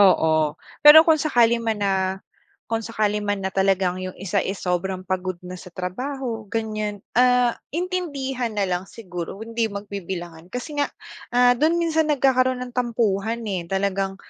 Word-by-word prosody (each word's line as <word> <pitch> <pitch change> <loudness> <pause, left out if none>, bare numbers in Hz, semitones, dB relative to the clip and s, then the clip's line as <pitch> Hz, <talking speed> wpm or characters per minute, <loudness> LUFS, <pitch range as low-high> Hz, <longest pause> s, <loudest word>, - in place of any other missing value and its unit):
Oo, 160 -6 +4 0.2
pero 310 +2 +10
kung 315 -3 +4
sakali 235 -5 +3
man 225 -2 -1
na 195 - +2 0.8
kung 225 - +1
sakali 215 -2 -1
man 205 -2 -2
na 190 - -2
talagang 190 -2 +1
yung 185 0 -6
isa, 190 -1 -1
eh, 195 - -3
sobrang 185 +1 -2
pagod 185 0 -2
na 180 0 -8
sa - - -11
trabaho 225 +5 -5
ganyan, 215 -2 -3
ah, 250 0 +4 0.2
intindihan 285 -8 -2
na 200 - +2
lang 185 +1 -2
siguro, 180 -4 -7
hindi 230 0 -1
magbibilangan 185 -4 -7
kasi 290 +6 -4
nga, 285 - +1 0.5
ah, 245 0 +6
do'n 310 +7 +2
minsan 320 -2 +1
nagkakaroon 260 -3 +3
ng 245 - -11
tampuhan, 230 -2 0
eh. 180 -5 -3
Talagang, 195 0 -1
215 Hz, 155 wpm, -23 LUFS, 190-250 Hz, 0.8 s, pero